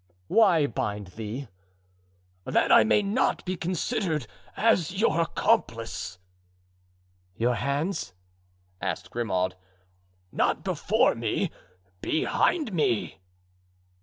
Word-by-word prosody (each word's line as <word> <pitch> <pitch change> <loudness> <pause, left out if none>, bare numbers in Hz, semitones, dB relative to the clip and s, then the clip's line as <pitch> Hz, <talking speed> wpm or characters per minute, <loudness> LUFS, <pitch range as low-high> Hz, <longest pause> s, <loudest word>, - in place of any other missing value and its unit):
"Why 185 -9 +5
bind 105 -6 -3
thee?" 110 +7 -6 1.0
"That - - +2
I - - +8
may 155 - +3
not 205 +6 0
be 185 0 -2
considered 175 - -1 0.3
as 190 -4 +2
your 170 -6 +3
accomplice." 115 - 0 1.2
"Your 120 +2 +2
hands?" 140 - -2 0.7
asked 95 -4 -3
Grimaud. 95 -6 -1 0.8
"Not - - 0
before - - +2
me, - - -1 0.5
behind 270 - +1
me." 120 - 0
145 Hz, 90 wpm, -27 LUFS, -, 1.2 s, I